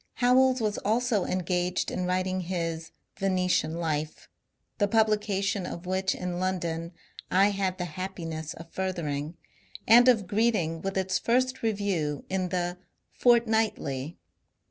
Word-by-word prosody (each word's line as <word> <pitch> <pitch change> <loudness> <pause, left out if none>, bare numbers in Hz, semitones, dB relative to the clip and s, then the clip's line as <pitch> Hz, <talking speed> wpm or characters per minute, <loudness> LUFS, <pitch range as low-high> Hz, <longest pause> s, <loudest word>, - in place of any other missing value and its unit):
Howells 255 +1 +4
was 210 -2 -1
also 220 -1 +1
engaged 180 0 -1
in 180 0 -2
writing 185 +1 0
his 165 -2 -3 0.3
'^ - - -24
Venetian 180 -4 +1
Life," 155 -2 -3 0.5
the 205 - +3
publication 205 -3 +1
of 170 - -7
which 190 +1 0
in 180 -1 -4
London 170 -2 -2 0.4
I 195 +2 +4
had 190 -2 -1
the 180 - -2
happiness 165 -2 -5
of 165 +1 -12
furthering, 165 -4 -3 0.5
and 240 +3 +8
of 225 -6 +4
greeting 200 -6 +1
with 195 0 -3
its 190 -1 0
first 255 +2 +1
review, 200 -10 -1
in 185 -1 0
the 175 0 -2 0.2
" - - -49
Fort 240 -1 +5
nightly." 170 - -1
185 Hz, 140 wpm, -28 LUFS, 170-210 Hz, 0.5 s, and